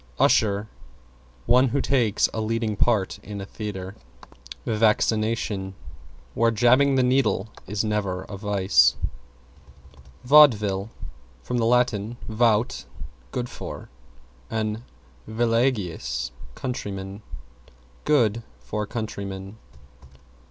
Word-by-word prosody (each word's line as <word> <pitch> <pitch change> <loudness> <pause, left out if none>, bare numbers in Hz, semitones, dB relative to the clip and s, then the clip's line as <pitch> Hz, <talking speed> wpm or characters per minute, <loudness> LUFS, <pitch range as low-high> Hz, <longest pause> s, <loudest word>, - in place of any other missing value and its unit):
=USHER= 105 0 +3 0.8
One 125 +2 +5
who 140 +3 0
takes 125 -6 +2
a 110 - -2
leading 110 -1 -1
part 105 -3 +1
in 105 0 -8
a 95 - -5
theatre. 100 -2 -6 0.7
=VACCINATION= 110 -2 +1 0.6
Where 115 0 +3
"jabbing 125 +5 +4
the 130 - +3
needle" 125 -5 +1 0.2
is 105 +2 -1
never 100 -4 -1
a 100 - -8
vice. 95 - +3 1.3
=VAUDEVILLE= 110 -8 +5 0.5
From 125 - -2
Lat. 125 +2 +3 0.4
vaut, 110 0 +1 0.5
good 125 -1 -3
for, - - -8 0.6
and 110 0 -2 0.5
villageois, 110 - 0 0.2
countryman. 100 -5 -5 0.8
Good 115 -7 +2 0.2
for 105 +12 -4
countrymen. 100 -3 -6
110 Hz, 90 wpm, -24 LUFS, 100-120 Hz, 1.3 s, One